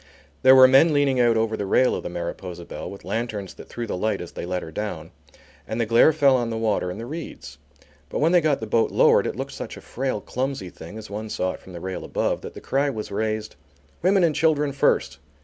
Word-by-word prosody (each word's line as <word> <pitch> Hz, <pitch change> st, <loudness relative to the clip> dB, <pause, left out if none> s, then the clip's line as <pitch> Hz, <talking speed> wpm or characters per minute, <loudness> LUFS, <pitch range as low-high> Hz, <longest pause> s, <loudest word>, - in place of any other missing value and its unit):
There 130 Hz, 0 st, +8 dB
were 130 Hz, 0 st, +9 dB
men 135 Hz, +5 st, +5 dB
leaning 140 Hz, -3 st, +2 dB
out 120 Hz, -2 st, +4 dB
over 110 Hz, 0 st, 0 dB
the 100 Hz, -2 st, -4 dB
rail 130 Hz, +6 st, +3 dB
of -, -, -3 dB
the -, -, -5 dB
Mariposa 85 Hz, 0 st, -6 dB
Belle -, -, -7 dB
with 100 Hz, -, -11 dB
lanterns 110 Hz, -4 st, -3 dB
that -, -, -13 dB
threw 120 Hz, -, -5 dB
the 110 Hz, -, -3 dB
light 105 Hz, +2 st, -1 dB
as 85 Hz, -, -7 dB
they -, -, -6 dB
let 90 Hz, 0 st, -2 dB
her 80 Hz, -, -8 dB
down, 85 Hz, -3 st, -5 dB, 0.6 s
and 110 Hz, -, -3 dB
the 115 Hz, -, +2 dB
glare 115 Hz, +7 st, +5 dB
fell 145 Hz, -4 st, +4 dB
on 120 Hz, -2 st, 0 dB
the 115 Hz, -, -3 dB
water 110 Hz, -5 st, 0 dB
and 90 Hz, -, -6 dB
the 115 Hz, -, -5 dB
reeds. 120 Hz, -, -8 dB, 0.5 s
But -, -, -4 dB
when 160 Hz, +3 st, +3 dB
they 175 Hz, -1 st, +5 dB
got 150 Hz, -3 st, +1 dB
the -, -, -3 dB
boat 110 Hz, +1 st, +2 dB
lowered, -, -, +4 dB
it -, -, -3 dB
looked -, -, -5 dB
such -, -, -7 dB
a -, -, -10 dB
frail, 130 Hz, -3 st, -3 dB
clumsy 125 Hz, -5 st, -4 dB
thing 85 Hz, +7 st, -10 dB
as 110 Hz, -2 st, -9 dB
one 110 Hz, +2 st, -5 dB
saw 95 Hz, -2 st, -1 dB
it -, -, -9 dB
from 95 Hz, -, -14 dB
the 85 Hz, -, -7 dB
rail 95 Hz, +1 st, -5 dB
above, -, -, -1 dB
that -, -, -9 dB
the -, -, -7 dB
cry 140 Hz, +1 st, 0 dB
was 110 Hz, -6 st, -5 dB
raised: 110 Hz, +1 st, -3 dB, 0.4 s
"Women 190 Hz, +1 st, +3 dB
and 165 Hz, -3 st, +3 dB
children 150 Hz, -2 st, +2 dB
first!" 140 Hz, -, +1 dB
115 Hz, 250 wpm, -24 LUFS, 100-135 Hz, 0.6 s, were